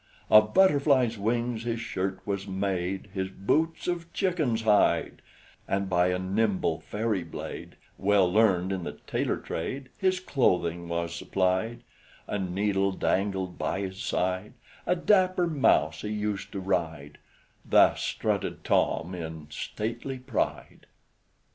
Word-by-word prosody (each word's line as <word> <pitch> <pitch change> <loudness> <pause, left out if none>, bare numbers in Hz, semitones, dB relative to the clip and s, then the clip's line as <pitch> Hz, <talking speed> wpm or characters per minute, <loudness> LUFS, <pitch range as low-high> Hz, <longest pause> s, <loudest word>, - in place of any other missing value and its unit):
"Of 110 0 +6
Butterfly's 140 - +4
wings 115 +2 -1
his 115 0 -2
shirt 95 -4 -3
was 100 0 -3
made, 95 0 -2
His 95 -2 -2
boots 155 +13 0
of 170 -1 -3
chicken's 155 - 0
hide; 105 -2 +3 0.5
And 100 -1 -1
by 90 0 +4
a 90 0 +1
nimble 95 +2 0
fairy 110 -2 -2
blade, 80 - -8 0.2
Well 100 -1 +4
learned 95 -4 +3
in 95 -2 -2
the - - -5
tailoring - - -1
trade, 130 +11 -4
His 185 -2 +2
clothing 85 - 0
was 85 0 -2
supplied 95 +6 -1 0.4
A 105 - -3
needle 95 +1 0
dangled 95 -1 -1
by 95 - -1
his 95 0 -5
side; 95 +3 -1 0.3
A 180 - +3
dapper 185 -1 +3
mouse 155 -5 +2
he 105 - -4
used 105 -2 -3
to 100 - -3
ride, 80 -6 -2 0.4
Thus - - +4
strutted - - -2
Tom 85 +3 +1
in 80 -3 -7
stately 120 - -4
pride!" 125 -2 -3
100 Hz, 130 wpm, -28 LUFS, 95-120 Hz, 0.5 s, Of